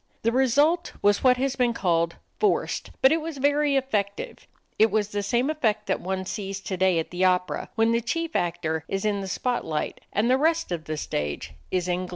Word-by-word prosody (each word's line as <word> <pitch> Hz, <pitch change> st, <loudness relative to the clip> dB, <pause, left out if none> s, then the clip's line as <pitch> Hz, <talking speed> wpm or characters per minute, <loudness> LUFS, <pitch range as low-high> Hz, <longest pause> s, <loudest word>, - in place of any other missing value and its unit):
The 230 Hz, -, +3 dB
result 285 Hz, +7 st, +2 dB
was 205 Hz, 0 st, +3 dB
what 250 Hz, -1 st, +5 dB
has 270 Hz, +1 st, 0 dB
been 240 Hz, -2 st, +1 dB
called 170 Hz, -4 st, +1 dB, 0.2 s
"forced," 420 Hz, -2 st, 0 dB
but 265 Hz, -, +7 dB
it 325 Hz, 0 st, +2 dB
was 320 Hz, -2 st, -5 dB
very 285 Hz, +1 st, +2 dB
effective. 210 Hz, -7 st, -2 dB, 0.3 s
It 220 Hz, -, +6 dB
was 210 Hz, -2 st, 0 dB
the 205 Hz, -1 st, -2 dB
same 240 Hz, +6 st, +1 dB
effect 220 Hz, -9 st, 0 dB
that -, -, -1 dB
one 190 Hz, +1 st, -3 dB
sees 195 Hz, 0 st, -4 dB
today 190 Hz, -2 st, +1 dB
at 165 Hz, -, -2 dB
the 180 Hz, +1 st, -1 dB
opera, 180 Hz, -4 st, +1 dB
when 225 Hz, 0 st, +3 dB
the 230 Hz, 0 st, +2 dB
chief 330 Hz, +8 st, -3 dB
actor 165 Hz, -3 st, -1 dB
is 195 Hz, +1 st, -2 dB
in 205 Hz, -2 st, 0 dB
the 195 Hz, -, -5 dB
spot 245 Hz, +6 st, -1 dB
light 155 Hz, -1 st, -3 dB
and 210 Hz, +3 st, +1 dB
the 260 Hz, +2 st, +3 dB
rest 325 Hz, -, +1 dB
of 165 Hz, -3 st, -3 dB
the 155 Hz, 0 st, -4 dB
stage 75 Hz, -, -3 dB, 0.2 s
is 180 Hz, -1 st, -1 dB
in 180 Hz, +1 st, -1 dB
gloom. -, -, -14 dB
210 Hz, 210 wpm, -25 LUFS, 180-265 Hz, 0.3 s, but